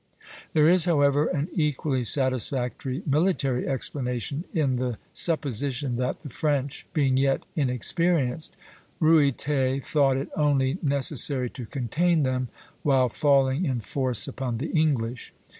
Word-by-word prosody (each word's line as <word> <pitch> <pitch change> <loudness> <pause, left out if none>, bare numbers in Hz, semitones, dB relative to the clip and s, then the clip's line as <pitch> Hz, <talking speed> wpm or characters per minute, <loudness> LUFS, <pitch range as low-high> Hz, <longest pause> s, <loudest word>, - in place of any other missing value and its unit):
There 155 -1 +4
is, 175 0 +5
however, 145 -3 +3
an 145 +2 -1
equally 150 -5 0
satisfactory 130 - 0
military 145 -4 +1
explanation 135 - -2
in 140 -7 0
the 125 -2 -2 0.2
supposition 140 -4 -1
that, 125 0 -2
the 145 - -8
French 145 +1 -2
being 135 -4 +1
yet 135 0 +1
inexperienced, 145 +2 0 0.4
Ruyter 140 -4 +2
thought 135 -1 +1
it 135 - -4
only 145 +1 +1
necessary 140 -3 +1
to 120 -4 -8
contain 150 +7 0
them 130 -1 -1 0.3
while 130 -3 +2
falling 135 +3 +2
in 130 -5 -1
force 120 0 -1
upon 125 -4 -4
the 140 +7 -4
English. 130 -7 -1
135 Hz, 125 wpm, -25 LUFS, 130-150 Hz, 0.4 s, is